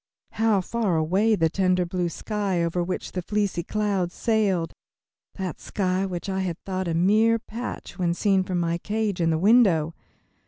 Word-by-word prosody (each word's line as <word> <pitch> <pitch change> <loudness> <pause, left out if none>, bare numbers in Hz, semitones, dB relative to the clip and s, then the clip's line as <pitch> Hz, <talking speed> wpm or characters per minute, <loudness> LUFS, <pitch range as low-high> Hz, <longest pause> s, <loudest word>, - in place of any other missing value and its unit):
How 220 -3 +2
far 210 -2 -1
away 190 +8 +2
the 165 -4 +2
tender 185 +1 +1
blue 175 0 -1
sky 195 -1 -2
over 170 +1 0
which 185 +1 -4
the 180 - -3
fleecy 205 -1 -1
clouds 195 -2 -1
sailed, 200 -7 +1 0.6
that 185 -4 -4
sky 190 -1 -1
which 180 0 -5
I 190 -1 -1
had 180 -3 -2
thought 185 -1 -2
a 165 - -1
mere 215 +6 +4
patch 230 -2 -7
when 170 -1 +1
seen 195 0 +2
from 185 -1 -2
my 170 0 0
cage 210 -2 -2
in 165 - +2
the 160 - +2
window! 185 -5 +4
185 Hz, 170 wpm, -25 LUFS, 175-210 Hz, 0.6 s, mere